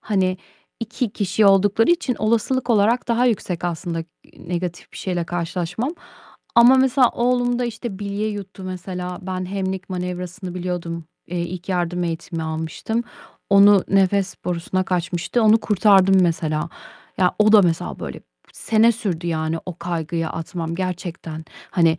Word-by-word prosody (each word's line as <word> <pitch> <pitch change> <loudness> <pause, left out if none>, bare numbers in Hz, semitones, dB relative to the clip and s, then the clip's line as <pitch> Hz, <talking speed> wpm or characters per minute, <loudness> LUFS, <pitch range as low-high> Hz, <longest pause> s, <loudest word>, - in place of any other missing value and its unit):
Hani 185 -3 0 0.4
2 230 0 -2
kişi 200 0 +1
oldukları 200 - +4
için 340 -8 +1
olasılık 235 +3 0
olarak 225 +3 +3
daha 240 +2 +3
yüksek 185 -7 -1
aslında, 170 0 -3
ııı, 165 0 -12
negatif 175 0 -4
bir - - -11
şeyle 180 -3 -2
karşılaşmam 175 - -3 0.6
ama 240 +2 +8
mesela 260 -1 +4
oğlumda 245 0 +1
işte 230 -3 -5
bilye 205 +1 -2
yuttu 200 -2 -7
mesela. 180 -1 -5
Ben 185 0 -4
Heimlich 190 0 -3
Manevrası'nı 180 +1 -5
biliyordum, 175 -2 -4 0.2
eee, 175 +1 -4
ilk 175 +1 -5
yardım 180 -1 -1
eğitimi 165 0 -4
almıştım. 160 +8 -3 0.5
Onu 200 0 +7
nefes 195 0 +2
borusuna 180 +1 -1
kaçmıştı, 180 +5 -1
onu 220 +1 +6
kurtardım 195 -3 +4
mesela. 160 -2 0 0.5
Ya, 180 -1 +3
o 215 0 +5
da 210 -2 +8
mesela 165 - -1
böyle - - -6 0.3
sene 225 +1 +3
sürdü 190 -7 -3
yani 160 -1 -1
o 180 -2 -6
kaygıyı 170 -1 -2
atmam 165 0 -4
gerçekten. 170 -3 -5 0.3
Hani, 165 -3 +3
185 Hz, 140 wpm, -22 LUFS, 170-210 Hz, 0.6 s, ama